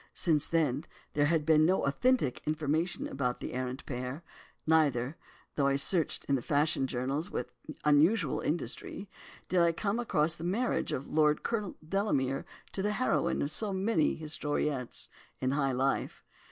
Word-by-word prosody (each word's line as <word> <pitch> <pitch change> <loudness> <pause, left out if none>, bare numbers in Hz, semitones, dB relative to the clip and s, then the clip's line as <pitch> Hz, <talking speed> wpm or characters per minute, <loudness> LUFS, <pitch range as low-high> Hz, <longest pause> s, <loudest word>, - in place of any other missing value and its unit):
Since 155 -4 +2
then, 150 -3 +1 0.3
there 145 0 +3
had 160 -1 +1
been 155 -1 +5
no 185 +4 +3
authentic 145 - +1
information 155 +3 0
about 125 -2 -2
the - - -6
arrant 130 +1 -4
pair—neither, 140 +1 -1 0.4
though 140 -2 +1
I 140 - +2
searched 160 +4 +2
the 135 -3 +1
fashion 145 0 +1
journals 135 +7 -2
with - - -4 0.3
unusual 150 +3 +4
industry, 155 - -4 0.4
did 185 - +2
I 170 -1 +4
come 200 +6 -1
across 160 -9 +1
the 165 - -9
marriage 215 +8 0
of 130 - -3 0.4
Colonel 210 -5 -2
Delamere 140 -9 0 0.3
to 195 - -3
the 210 +1 0
heroine 190 - +1
of 140 - -2
so 205 +5 -1
many 190 -4 +1
historiettes 150 -4 -2 0.3
in 130 - -1
high 140 -1 +1
life. 130 +2 -1
150 Hz, 145 wpm, -31 LUFS, 135-175 Hz, 0.4 s, been